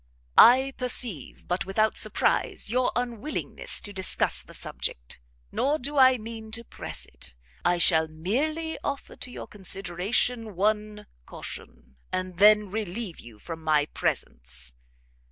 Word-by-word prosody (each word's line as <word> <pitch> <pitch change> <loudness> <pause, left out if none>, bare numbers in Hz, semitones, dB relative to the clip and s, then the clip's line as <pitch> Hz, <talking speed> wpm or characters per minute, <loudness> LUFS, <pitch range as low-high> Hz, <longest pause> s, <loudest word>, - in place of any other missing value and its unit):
"I 265 +3 +7
perceive, 245 - +3
but 180 +1 -1
without 215 +3 +1
surprise, 390 - +1
your 250 +1 +2
unwillingness 245 +3 -3
to 205 - -7
discuss 190 -1 +1
the - - -14
subject; - - -5 0.3
nor 290 +3 +1
do 285 +2 -3
I 260 -2 +6
mean 220 0 -8
to 230 +1 -1
press - - -5
it: - - -14 0.3
I 175 0 +2
shall 160 -2 +6
merely 285 - -2
offer 280 -1 -4
to - - -5
your - - -7
consideration 200 +4 -1
one 210 +2 -1 0.2
caution, 65 +1 -10
and 185 -1 -3
then 210 -1 +6
relieve 210 -2 -4
you 115 -2 -13
from 160 +8 -8
my 155 -2 +3
presence. 60 - -3
210 Hz, 135 wpm, -26 LUFS, 175-245 Hz, 0.3 s, I